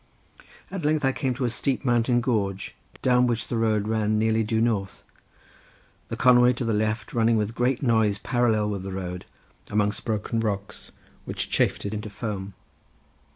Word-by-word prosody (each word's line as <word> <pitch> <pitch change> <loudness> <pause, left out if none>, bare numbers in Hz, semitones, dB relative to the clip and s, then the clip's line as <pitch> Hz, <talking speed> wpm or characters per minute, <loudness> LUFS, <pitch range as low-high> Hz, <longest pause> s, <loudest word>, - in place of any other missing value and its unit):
At 195 -4 -4
length 150 -1 +1
I 135 - +3
came 130 -1 -1
down - - -10
to 130 - -1
a - - +1
steep 135 +3 -2
mountain 120 0 +2
gorge 100 -6 -1 0.3
down 125 -1 +4
which 115 -2 -2
the - - -1
road 110 -2 +1
ran 110 -1 +1
nearly 110 +1 +2
due 110 +1 0
north, 110 -5 -1 1.0
the - - -5
Conway 125 0 +6
to 125 0 -4
the 115 - 0
left 110 +1 -1
running 115 -1 +3
with 105 +1 -1
great 125 +3 0
noise 110 -4 +2
parallel 110 -2 +1
with 100 -2 -3
the 95 0 -6
road, 90 -1 -5 0.4
amongst 105 0 0
broken 110 +1 -2
rocks, 100 -3 -3 0.3
which - - -3
chafed - - +1
it 100 - -3
into 105 0 -4
foam. 100 -2 -5
110 Hz, 175 wpm, -25 LUFS, 105-120 Hz, 1.0 s, Conway